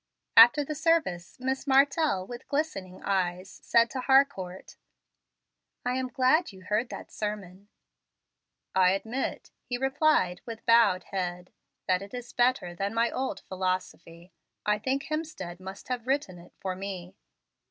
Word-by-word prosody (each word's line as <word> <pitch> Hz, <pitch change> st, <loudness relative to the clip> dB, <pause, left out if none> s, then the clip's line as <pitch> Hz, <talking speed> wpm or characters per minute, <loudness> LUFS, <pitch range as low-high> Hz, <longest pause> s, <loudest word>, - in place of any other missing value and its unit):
After 240 Hz, +6 st, +8 dB
the 305 Hz, -, -3 dB
service, 305 Hz, -, 0 dB
Miss 265 Hz, +2 st, -2 dB
Martell, 275 Hz, -, +3 dB
with 240 Hz, +5 st, -9 dB
glistening 200 Hz, -12 st, -3 dB
eyes, 185 Hz, -1 st, -1 dB
said 235 Hz, 0 st, +4 dB
to 260 Hz, -, -3 dB
Harcourt, 265 Hz, -10 st, +1 dB, 1.1 s
"I 245 Hz, -, +1 dB
am 260 Hz, 0 st, -1 dB
glad 260 Hz, +6 st, +2 dB
you 190 Hz, -1 st, -14 dB
heard 210 Hz, +6 st, 0 dB
that -, -, -8 dB
sermon." 205 Hz, -2 st, -5 dB, 1.0 s
"I 185 Hz, 0 st, +5 dB
admit," 230 Hz, +7 st, -3 dB
he 245 Hz, -, -3 dB
replied, 270 Hz, -, +2 dB
with 225 Hz, -2 st, -8 dB
bowed 220 Hz, -6 st, +5 dB
head, 180 Hz, -2 st, -3 dB, 0.3 s
"that 185 Hz, 0 st, +2 dB
it 200 Hz, +5 st, -8 dB
is 245 Hz, -1 st, -8 dB
better 245 Hz, -8 st, +2 dB
than 195 Hz, +5 st, -3 dB
my 230 Hz, +1 st, +2 dB
old 260 Hz, -7 st, -3 dB
philosophy. 185 Hz, -2 st, -4 dB, 0.3 s
I 210 Hz, 0 st, +2 dB
think 265 Hz, +5 st, -1 dB
Hemstead 305 Hz, -, -5 dB
must 190 Hz, +1 st, -9 dB
have 250 Hz, -1 st, -3 dB
written 265 Hz, -10 st, -1 dB
it 170 Hz, -, -16 dB
for 185 Hz, -1 st, -3 dB
me." 190 Hz, -1 st, -7 dB
210 Hz, 140 wpm, -28 LUFS, 185-265 Hz, 1.1 s, After